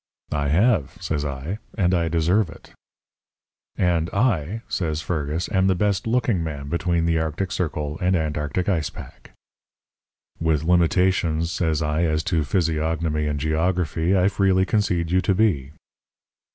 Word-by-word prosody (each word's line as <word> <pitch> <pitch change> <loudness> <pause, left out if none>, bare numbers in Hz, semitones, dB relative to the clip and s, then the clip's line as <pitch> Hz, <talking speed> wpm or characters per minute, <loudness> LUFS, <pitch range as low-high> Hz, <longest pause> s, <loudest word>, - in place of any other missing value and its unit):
"'I 70 -1 0
have,' 90 - +2
says 75 -2 -2
I. 75 +8 -4 0.2
'And 90 -3 +2
I 85 -2 +1
deserve 85 +4 +2
it.' 85 - -14 1.1
"'And 85 -2 +1
I,' 100 - 0
says 80 -4 -2
Fergus, 80 0 -2
'am 95 0 +2
the 95 - +3
best 100 +2 0
looking 115 -6 +1
man 70 -3 -5
between 85 0 0
the 80 -1 +2
arctic 80 +4 -2
circle 75 -4 -3
and 90 +1 +2
antarctic 80 +2 -1
ice 85 -7 0
pack.' - - -12 1.1
"'With 80 -2 +1
limitations,' 85 -1 +2
says 80 -3 0
I, 75 +2 0
'as 80 0 0
to 80 -2 +2
physiognomy 80 -1 0
and 75 -1 -2
geography, 80 +3 0
I 90 +1 +4
freely 95 -1 +2
concede 90 -6 0
you 95 0 +3
to 95 +1 +1
be.' 85 -10 +1
85 Hz, 145 wpm, -23 LUFS, 80-95 Hz, 1.1 s, I